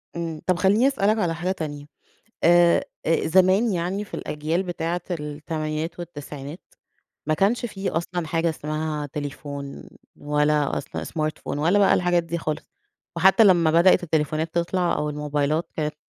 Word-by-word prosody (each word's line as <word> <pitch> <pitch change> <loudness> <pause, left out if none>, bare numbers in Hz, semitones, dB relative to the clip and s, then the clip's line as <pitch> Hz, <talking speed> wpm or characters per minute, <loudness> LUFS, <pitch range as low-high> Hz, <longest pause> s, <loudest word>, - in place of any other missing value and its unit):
إمم، 165 -2 -4
طب 185 - +3
خلّيني 200 +7 +4
أسألك 215 -6 +2
على 175 -6 0
حاجة 175 +3 -2
تانية. 150 -5 -5 0.6
آآ، 175 0 +5 0.2
آآ، 165 - +2
زمان 190 +6 +4
يعني، 185 +3 -2
في - - -11
الأجيال 155 +4 -2
بتاعة 175 -1 -3
التمانينات 155 +1 -4
والتسعينات، 150 -2 -8 0.7
ما 155 - +2
كانش 210 +9 +1
في 195 -3 -4
أصلًا 170 +1 -3
حاجة 165 +1 0
اسمها 155 -1 -3
تليفون، 145 -1 -7 0.3
ولا 150 0 +1
أصلًا - - -6
smartphone 155 -2 -3
ولا 170 +7 +3
بقى 200 - +5
الحاجات 175 -1 +2
دي 165 +1 -4
خالص، 155 -2 -4 0.5
وحتى 190 +6 +6
لما 175 -5 +5
بدأت 170 +4 +5
التليفونات 155 0 -1
تطلع 175 0 +1
أو 150 0 -2
الموبايلات 150 +2 -1
كانت 150 -1 -2
165 Hz, 145 wpm, -24 LUFS, 150-180 Hz, 0.7 s, وحتى